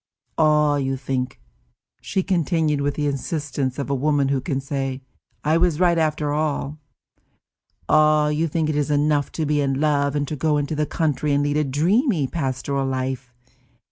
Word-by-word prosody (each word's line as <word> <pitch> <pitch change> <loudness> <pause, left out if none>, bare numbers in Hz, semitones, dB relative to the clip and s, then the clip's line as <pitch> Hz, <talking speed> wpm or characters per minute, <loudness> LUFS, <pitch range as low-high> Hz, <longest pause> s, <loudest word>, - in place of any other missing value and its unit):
"Ah, 150 -2 +4
you 135 -1 -1
think," 130 -1 -3 0.6
she 190 -2 -1
continued, 165 -5 +1
with 145 0 -1
the 150 - -1
insistence 140 -2 -2
of 140 - -3
a 140 - -1
woman 140 0 +1
who 135 -1 0
can 135 0 -2
say, 135 -1 -3 0.4
I 155 +2 +2
was 170 -3 +2
right 175 -2 +3
after 155 -2 0
all, 150 -1 -2 1.1
"ah, 155 -1 +4
you 155 +2 0
think 160 0 -1
it 155 - -1
is 150 0 0
enough 145 0 +1
to 160 - -2
be 150 0 +1
in 135 -1 0
love, 145 -1 +1
and 145 -1 -1
to 155 - -3
go 150 +1 +1
into 145 +1 -2
the 150 0 -1
country 150 -2 0
and 140 0 +2
lead 145 +1 0
a 150 - +2
dreamy, 170 - +1
pastoral 135 -2 -2
life. 130 -1 -3
145 Hz, 175 wpm, -22 LUFS, 140-155 Hz, 1.1 s, Ah